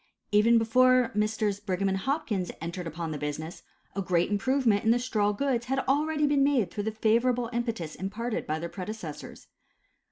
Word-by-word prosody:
Even 220 +3 +5
before 250 +2 +4
Messrs. 210 -1 0
Brigham 195 -1 -1
& 190 - +1
Hopkins 220 - -1
entered 170 +2 -5
upon 165 0 -4
the 150 - -4
business, 150 +3 -5 0.3
a 200 - -1
great 175 0 +1
improvement 225 0 +2
in 220 - +2
the 235 - +5
straw 220 -4 0
goods 240 +2 -1
had 270 +1 -1
already 300 +2 +2
been 285 -1 +3
made 275 -8 +2
through 205 -1 -4
the 220 - 0
favorable 235 +2 +1
impetus 230 -9 -3
imparted 215 +4 -4
by 155 - -1
their 170 +2 -4
predecessors. 185 -4 -7
215 Hz, 170 wpm, -28 LUFS, 185-245 Hz, 0.3 s, Even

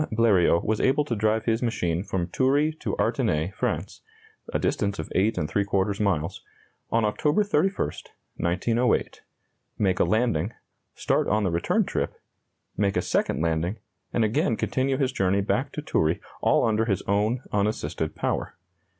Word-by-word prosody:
Bleriot 100 -7 +3
was 110 0 0
able 140 +3 +2
to 120 - -2
drive 110 +1 +1
his 115 0 +1
machine 90 -8 0
from 95 -4 -2
Toury 135 - +2
to - - -2
Artenay, 80 +6 0
France - - -3 0.5
(a - - +1
distance 100 -1 -1
of - - -4
8¾ 100 0 0
miles) 90 -7 0 0.5
on 115 -1 +2
October 150 - +2
31, 195 -1 +1 0.5
1908, 115 +9 0 0.6
make 95 -3 +1
a - - +5
landing, 110 -4 +1 0.4
start - - +1
on 105 +2 +2
the 95 - +1
return 85 +1 +1
trip, - - -2 0.6
make 100 -1 +1
a - - +3
second 80 - 0
landing, 85 +5 0 0.3
and 115 - +2
again 110 +1 +1
continue 130 0 0
his 135 -2 +1
journey 100 -4 +1
back 130 +7 -1
to 150 - -5
Toury, 80 - +1 0.2
all - - +3
under 110 0 +2
his 100 -5 -1
own 105 +6 0
unassisted 105 +1 -1
power. - - -2
105 Hz, 150 wpm, -26 LUFS, 95-120 Hz, 0.6 s, a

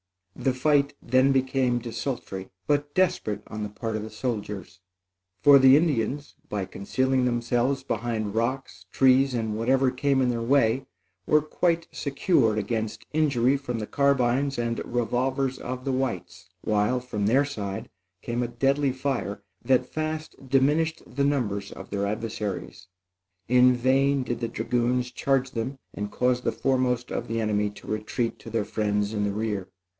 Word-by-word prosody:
The 130 - 0
fight 140 +1 +2
then 130 +2 +4
became 130 -2 +1
desultory, 115 -5 -5 0.2
but 145 0 0
desperate, 170 - +1
on 110 - -6
the 105 - -3
part 110 +2 -4
of 110 - -2
the 110 - -6
soldiers; 105 -5 -4 0.6
for 140 -1 +9
the 135 +1 +8
Indians, 145 -3 0 0.2
by 100 -2 -2
concealing 130 +7 0
themselves 120 +2 0
behind 115 -4 -2
rocks, 115 -6 -2
trees 130 0 +4
and 110 -2 -1
whatever 130 +4 +2
came 135 +1 +1
in 130 -1 +2
their 120 -1 -1
way, 130 +1 +2 0.4
were 150 -1 +4
quite 165 +1 0
secure 140 - +1
against 110 +1 -3
injury 140 -4 +3
from 135 -4 -3
the 110 - -3
carbines 140 +1 +1
and 115 -1 -1
revolvers 130 +3 -1
of 130 +1 -5
the 135 - 0
whites, 130 -8 -3
while, 105 +4 +1
from 105 -5 -2
their 135 +6 +4
side, 100 -8 -5 0.4
came 120 0 -2
a 120 - 0
deadly 135 +3 +1
fire 125 -6 -3 0.2
that 130 0 +3
fast 155 -3 -4
diminished 150 +5 +2
the 140 +3 -2
numbers 105 -9 -1
of - - -10
their 100 0 -1
adversaries. 105 -4 -4 0.6
In 125 +1 +5
vain 135 +2 +2
did 120 -1 -3
the 115 - -1
dragoons 120 +2 0
charge 135 -1 0
them 130 +2 -3 0.2
and 105 0 -4
cause 125 0 +1
the - - 0
foremost 125 -2 0
of 120 - -3
the 115 0 -2
enemy 105 -1 +1
to 105 - -14
retreat 110 +2 -2
to - - -10
their 110 -2 -1
friends 105 -1 -1
in 105 -1 -1
the 100 - 0
rear. 105 -3 -2
125 Hz, 160 wpm, -26 LUFS, 110-135 Hz, 0.6 s, for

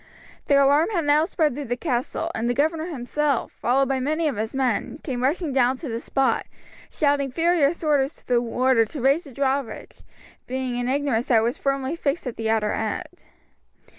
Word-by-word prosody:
The 285 - +4
alarm 280 +5 +4
had 345 -8 -1
now 295 +2 +4
spread 315 -4 0
through 285 +2 -5
the 245 0 -2
castle, 250 -4 -2
and 235 +2 -1
the 245 - 0
governor 315 +3 0
himself, 290 -2 -1
followed 270 +2 +1
by 270 0 0
many 310 +5 0
of 280 - -1
his 220 +4 -4
men, 260 -1 -1
came 255 -4 -3
rushing 295 +3 0
down 255 0 +3
to 290 0 -7
the 230 0 -3
spot, 270 +2 0 0.4
shouting 285 -2 +1
furious 330 +1 +2
orders 290 -1 +1
to - - -23
the 245 -1 +2
warder 245 0 +2
to 285 +7 -8
raise 275 +7 +2
the 280 - -11
drawbridge, 270 0 -3 0.5
being 255 -1 -3
in 245 0 -2
ignorance 265 -3 0
that 240 - +4
it - - +4
was 235 +2 -1
firmly 275 +2 -1
fixed 305 -2 -2
at 250 - -4
the 225 -1 -2
outer 215 -2 +1
end. 220 -2 -4
270 Hz, 195 wpm, -24 LUFS, 245-295 Hz, 0.5 s, The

